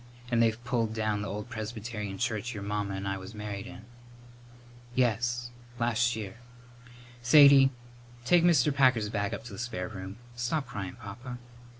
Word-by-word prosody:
And 120 -1 +3
they've 115 +1 +2
pulled 115 -3 -1
down 110 -2 0
the 105 - -3
old 105 +4 -5
Presbyterian 110 -3 -5
church 120 0 -2
your 100 - -5
mamma 100 -1 -2
and 95 +1 -4
I 95 0 -2
was 95 +4 -10
married 105 -2 -5
in." 105 - -11 1.1
"Yes; 120 0 +1 0.3
last 120 0 +1
year. 105 -2 -6 0.8
Sadie, 140 +1 +8 0.6
take 175 +3 +5
Mr. 155 -5 +4
Packer's 130 -6 +3
bag 100 -1 -1
up - - -5
to 115 -3 -9
the 95 - -7
spare 110 -7 -3
room. 95 -1 -7 0.2
Stop 120 +5 -1
cryin', 95 -3 -6
Papa." 120 +5 -8
115 Hz, 160 wpm, -29 LUFS, 105-120 Hz, 1.1 s, Sadie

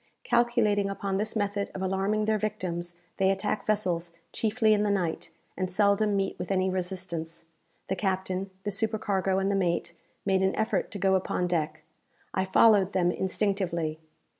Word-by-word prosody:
Calculating 235 -4 +2
upon 195 -1 -2
this 215 +3 -2
method 205 -1 -1
of 190 - -4
alarming 195 +3 0
their 215 0 +1
victims, 175 -4 -3 0.2
they 190 0 +3
attack 200 +2 -1
vessels 180 -5 0 0.2
chiefly 220 0 +2
in 210 - +2
the 210 - +1
night, 180 -5 -1 0.3
and 185 -1 -2
seldom 205 +1 +3
meet 195 -1 -1
with - - -4
any 190 -1 +1
resistance. 175 -3 -4 0.4
The 190 - -1
captain, 190 -1 -1
the 205 - -2
supercargo, 200 -2 0
and 195 +1 +1
the - - +1
mate, 175 -3 0 0.3
made 190 -1 +2
an 190 0 +2
effort 220 - 0
to 205 - -6
go 190 0 +2
upon 185 -1 0
deck. 160 -3 -1 0.5
I 190 - +1
followed 200 0 +5
them 175 -2 +3
instinctively. 185 -5 -1
195 Hz, 165 wpm, -28 LUFS, 185-205 Hz, 0.5 s, followed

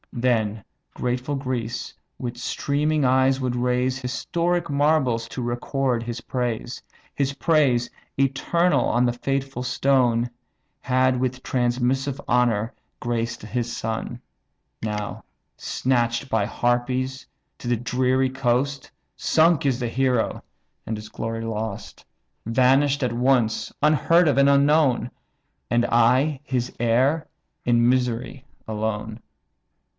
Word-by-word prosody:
Then 110 -4 0 0.3
grateful 125 +3 -2
Greece 125 -4 -3 0.2
with 120 -1 -5
streaming 145 +4 0
eyes 130 +1 +3
would 125 -2 -1
raise, 125 +1 0
Historic 170 +7 -1
marbles 140 -5 +2
to 125 - -5
record 120 0 -1
his 120 0 -5
praise; 120 0 -3 0.3
His 140 -1 0
praise, 135 -5 +2 0.3
eternal 140 +6 +2
on 120 +1 +2
the 120 - +1
faithful 135 0 -3
stone, 125 -3 +2 0.5
Had 130 0 +2
with 130 0 -2
transmissive 130 +2 0
honour 120 -2 +2 0.3
graced 115 -1 -2
his 120 +2 -3
son. 115 +2 -4 0.6
Now 105 -1 -4 0.3
snatch'd 120 0 -1
by 110 -4 +1
harpies 125 +3 -1 0.3
to - - -7
the 120 -1 +2
dreary 130 +2 +1
coast. 135 +2 -1 0.2
Sunk 160 -1 +3
is 130 -2 +1
the 120 - -1
hero, 125 -1 0 0.4
and 110 - -3
his 105 0 -9
glory 115 +1 -4
lost; 110 -1 -5 0.4
Vanish'd 135 +4 +3
at 125 -2 0
once! 120 -2 +1
unheard 160 +3 +4
of, 140 -3 +2
and 140 0 +5
unknown! 140 -3 +3 0.6
And 120 0 +2
I 130 +5 +3
his 125 -3 -2
heir 130 +7 +2 0.4
in 120 -1 +4
misery 125 0 0 0.2
alone. 110 0 -3
125 Hz, 115 wpm, -24 LUFS, 120-135 Hz, 0.6 s, and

